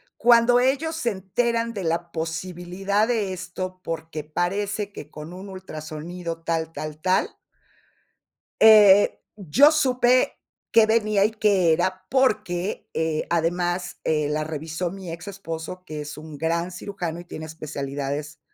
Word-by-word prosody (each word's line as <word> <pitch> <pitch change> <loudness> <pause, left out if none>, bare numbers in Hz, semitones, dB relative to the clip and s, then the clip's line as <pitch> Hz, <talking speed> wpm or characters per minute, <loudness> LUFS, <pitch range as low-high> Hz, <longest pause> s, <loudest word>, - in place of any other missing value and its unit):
cuando 240 +1 +5
ellos 280 +6 +1
se 250 -7 0
enteran 230 +4 -1
de 200 -4 -4
la 170 +1 -1
posibilidad 180 +5 -2
de 215 -6 0
esto, 185 0 -6
porque 160 -2 -5
parece 200 +6 -2
que 150 - -9
con 155 +3 -9
un 190 +2 -9
ultrasonido 165 -1 -7
tal, 165 -1 -1
tal, 155 0 -7
tal. 185 +2 +2 1.3
Eh, 210 -2 +7 0.2
yo 215 - +5
supe 255 -4 +3 0.4
qué 225 -1 +6
venía, 215 -3 +3
y 215 - +1
qué 200 -6 +3
era, 185 +3 -1
porque, 210 -8 0
eh 160 -1 -1
además, 175 +1 -1
eh, 150 -2 +1
la 155 +1 0
revisó 160 +3 -4
mi 190 -3 -7
exesposo, 170 -1 -7
que 155 -3 -6
es 150 0 -7
un 155 -1 -9
gran 170 +3 -1
cirujano 175 -2 -5
y 175 - -10
tiene 160 -2 -7
especialidades, 145 -1 -5
180 Hz, 135 wpm, -24 LUFS, 160-205 Hz, 1.3 s, Eh